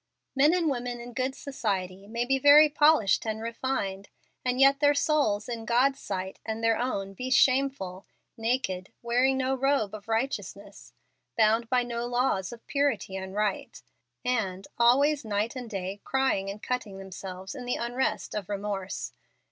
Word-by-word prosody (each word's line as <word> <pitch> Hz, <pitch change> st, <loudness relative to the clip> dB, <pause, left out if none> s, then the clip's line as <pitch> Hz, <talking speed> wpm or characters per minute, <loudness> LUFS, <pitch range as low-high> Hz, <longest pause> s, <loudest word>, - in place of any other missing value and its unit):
Men 285 Hz, +3 st, +5 dB
and 345 Hz, -3 st, +1 dB
women 245 Hz, -3 st, -2 dB
in 240 Hz, +1 st, -9 dB
good 260 Hz, +2 st, -2 dB
society 195 Hz, -9 st, -3 dB
may 235 Hz, +2 st, -2 dB
be 270 Hz, +1 st, +1 dB
very 290 Hz, +2 st, +8 dB
polished 295 Hz, -9 st, +4 dB
and 220 Hz, -1 st, -3 dB
refined, 225 Hz, -4 st, -3 dB, 0.3 s
and 250 Hz, 0 st, 0 dB
yet 275 Hz, +1 st, +6 dB
their 290 Hz, 0 st, +4 dB
souls 280 Hz, -8 st, +1 dB
in 235 Hz, -2 st, -4 dB
God's 255 Hz, +4 st, +2 dB
sight 190 Hz, -1 st, -5 dB
and 220 Hz, 0 st, -4 dB
their 225 Hz, 0 st, +4 dB
own 200 Hz, -6 st, -2 dB
be 255 Hz, +6 st, -5 dB
shameful, 260 Hz, -8 st, +2 dB, 0.3 s
"naked," 225 Hz, -5 st, -2 dB
wearing 250 Hz, +3 st, +2 dB
no 265 Hz, 0 st, 0 dB
robe 265 Hz, -6 st, +1 dB
of 210 Hz, -1 st, -9 dB
righteousness, 200 Hz, -, -4 dB, 0.4 s
bound 225 Hz, +2 st, +3 dB
by 250 Hz, -1 st, +3 dB
no 240 Hz, 0 st, -3 dB
laws 245 Hz, -6 st, 0 dB
of 235 Hz, -1 st, -11 dB
purity 280 Hz, -9 st, 0 dB
and 190 Hz, 0 st, -6 dB
right, 210 Hz, -2 st, -2 dB, 0.5 s
and 195 Hz, -7 st, -1 dB
"always, 275 Hz, +5 st, +4 dB
night 215 Hz, +3 st, -1 dB
and 250 Hz, -3 st, -6 dB
day, 195 Hz, -1 st, -5 dB
crying 265 Hz, -8 st, 0 dB
and 205 Hz, +2 st, -8 dB
cutting" 240 Hz, -6 st, -3 dB
themselves 190 Hz, 0 st, -8 dB
in 255 Hz, -3 st, -7 dB
the 245 Hz, -, -1 dB
unrest 245 Hz, +3 st, -2 dB
of 210 Hz, -3 st, -4 dB
remorse. 200 Hz, -1 st, -4 dB
235 Hz, 160 wpm, -28 LUFS, 200-265 Hz, 0.5 s, very